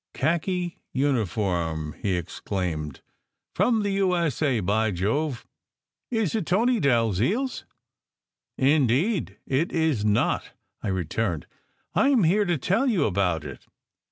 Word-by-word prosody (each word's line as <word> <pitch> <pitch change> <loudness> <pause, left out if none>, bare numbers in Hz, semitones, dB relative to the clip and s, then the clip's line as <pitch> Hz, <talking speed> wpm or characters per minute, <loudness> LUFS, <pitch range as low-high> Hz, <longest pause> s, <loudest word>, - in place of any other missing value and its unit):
"Khaki 175 +3 -1
uniform!" 95 - 0
he 95 -3 0
exclaimed. 85 -4 -4 0.5
"From 225 -3 +2
the 205 - 0
U. 195 -2 +2
S. 165 -6 -1
A. 135 -6 +2
By 105 +3 +1
Jove! 115 - -1 0.6
Is 225 -7 0
it 215 -7 -1
Tony 230 +6 +2
Dalziel 120 - +2
s? 260 - -5 0.5
" - - -65 0.2
"Indeed 155 - +1
it 135 +6 0
is 160 -10 +1
not," 105 -1 +1 0.3
I - - -4
returned. 95 -2 -1 0.5
"I 275 - +3
m 255 -8 +4
here 200 +6 +3
to 175 -3 +1
tell 195 - +1
you 195 - +2
about 90 -5 0
it. 70 -4 -10
130 Hz, 130 wpm, -25 LUFS, -, 0.6 s, m